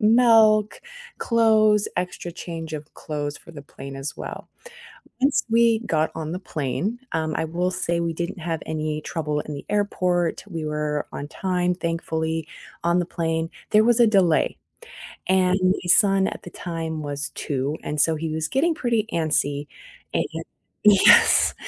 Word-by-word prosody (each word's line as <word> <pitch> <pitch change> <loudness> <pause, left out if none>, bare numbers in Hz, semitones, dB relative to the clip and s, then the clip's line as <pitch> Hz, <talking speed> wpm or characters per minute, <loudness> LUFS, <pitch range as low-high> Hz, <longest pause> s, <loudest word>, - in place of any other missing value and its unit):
milk, 220 -2 +5 0.4
clothes, 215 -3 +3
extra 180 -1 -3
change 165 -2 -7
of 150 0 -7
clothes 145 -2 -4
for 170 - -15
the 145 -3 -9
plane 135 0 -10
as 135 +2 -5
well. - - -7 0.7
Once 275 +2 +2
we 230 -1 +4
got 160 -8 0
on 160 0 -4
the 180 - -3
plane, 185 - -3
um, 160 -1 -1
I - - -1
will 175 +3 -1
say 170 -2 -1
we 170 -1 -1
didn't 170 +2 -4
have 165 -1 -3
any 155 -1 -3
trouble 150 -3 -2
in 150 - -7
the 140 - -7
airport, 180 -4 0
we 165 -4 -5
were 150 -1 -2
on 145 - -6
time, 180 -1 -1
thankfully, 160 -2 -2 0.3
on 170 +1 +2
the 175 - +1
plane, 165 -1 -2 0.2
there 215 +1 +6
was 240 0 +3
a 235 - +7
delay 190 -7 +3 0.7
and 185 0 +3
my 185 +1 +4
son 195 -1 +4
at - - -7
the 175 - -8
time 165 -3 -5
was 145 0 -4
2, 140 +1 -2
and 150 0 -2
so 160 0 +3
he 160 +1 -3
was 160 0 -2
getting 320 +6 +1
pretty 230 -6 0
antsy, 145 -3 0 0.5
and - - +2 0.6
yes, 205 -2 +6
170 Hz, 160 wpm, -23 LUFS, 155-200 Hz, 0.7 s, a